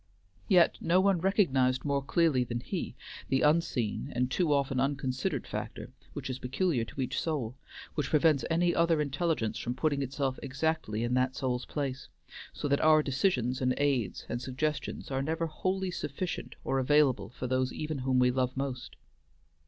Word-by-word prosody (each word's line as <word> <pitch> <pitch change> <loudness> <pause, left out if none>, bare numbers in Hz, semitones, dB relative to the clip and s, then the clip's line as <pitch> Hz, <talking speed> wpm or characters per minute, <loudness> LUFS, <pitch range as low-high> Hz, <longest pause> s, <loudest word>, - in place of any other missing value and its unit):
Yet 175 - +4
no 170 +3 +3
one 190 -3 +3
recognized 135 - +2
more 140 -1 +1
clearly 140 -2 +2
than 120 0 -3
he - - -4 0.3
the 135 - +2
unseen, 150 -6 +1
and 125 +1 0
too 170 +1 +1
often 135 -2 +1
unconsidered, 130 -1 -1
factor - - -6 0.2
which - - -5
is 130 0 -4
peculiar 130 0 0
to 135 - -6
each 130 +1 -1
soul, 135 -8 -2 0.4
which 150 -4 -2
prevents 150 -2 +3
any 175 +1 +2
other 170 -1 +3
intelligence 145 -4 -1
from 120 +1 -3
putting 140 +1 0
itself 135 0 -2
exactly 140 -5 -1
in 120 +1 -1
that 130 +1 +1
soul's 125 -2 -1
place, 140 -3 -4 0.4
so - - -4
that 140 0 +2
our 155 -1 +6
decisions 130 - 0
and 130 -1 +2
aids 135 -8 0
and 120 - -3
suggestions 140 +3 -3
are 135 0 0
never 160 +4 -1
wholly 185 +4 -2
sufficient 170 +2 -4
or 135 - 0
available 130 -6 +3
for 125 - -7
those 130 0 0
even 155 -2 -4
whom 130 0 +1
we 125 0 +4
love 130 0 -1
most. 135 -2 -4
135 Hz, 170 wpm, -30 LUFS, 130-155 Hz, 0.4 s, our